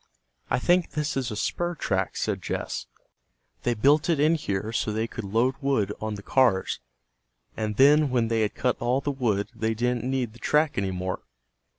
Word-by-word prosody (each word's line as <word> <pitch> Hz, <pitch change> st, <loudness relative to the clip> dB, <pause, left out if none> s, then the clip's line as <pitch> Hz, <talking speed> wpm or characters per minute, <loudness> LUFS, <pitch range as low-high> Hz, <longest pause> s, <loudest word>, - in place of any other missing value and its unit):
"I -, -, +2 dB
think 175 Hz, +6 st, +2 dB
this 150 Hz, 0 st, -1 dB
is 130 Hz, -3 st, -1 dB
a 105 Hz, -, -4 dB
spur 175 Hz, +10 st, -1 dB
track," 95 Hz, -, -1 dB
said -, -, -1 dB
Jess. -, -, -4 dB, 0.7 s
"They 120 Hz, -, 0 dB
built 145 Hz, +8 st, +3 dB
it 165 Hz, -4 st, +2 dB
in 155 Hz, +3 st, +4 dB
here 105 Hz, -8 st, -2 dB
so 115 Hz, -1 st, -1 dB
they 110 Hz, +1 st, -1 dB
could 115 Hz, -, -7 dB
load 115 Hz, +6 st, +1 dB
wood 130 Hz, -8 st, +1 dB
on 110 Hz, -1 st, -2 dB
the 100 Hz, -, -9 dB
cars, 120 Hz, -8 st, +2 dB, 0.8 s
and 110 Hz, -1 st, -2 dB
then 145 Hz, +4 st, +6 dB
when 120 Hz, -3 st, +1 dB
they 115 Hz, 0 st, +1 dB
had 105 Hz, -, 0 dB
cut 125 Hz, -, 0 dB
all 125 Hz, +3 st, +1 dB
the 145 Hz, -, -1 dB
wood 110 Hz, -7 st, 0 dB
they 110 Hz, -1 st, -1 dB
didn't 120 Hz, +1 st, 0 dB
need 130 Hz, -3 st, -1 dB
the 120 Hz, -, -15 dB
track 150 Hz, 0 st, +2 dB
any 100 Hz, -1 st, 0 dB
more." 95 Hz, 0 st, -3 dB
120 Hz, 195 wpm, -26 LUFS, 105-140 Hz, 0.8 s, then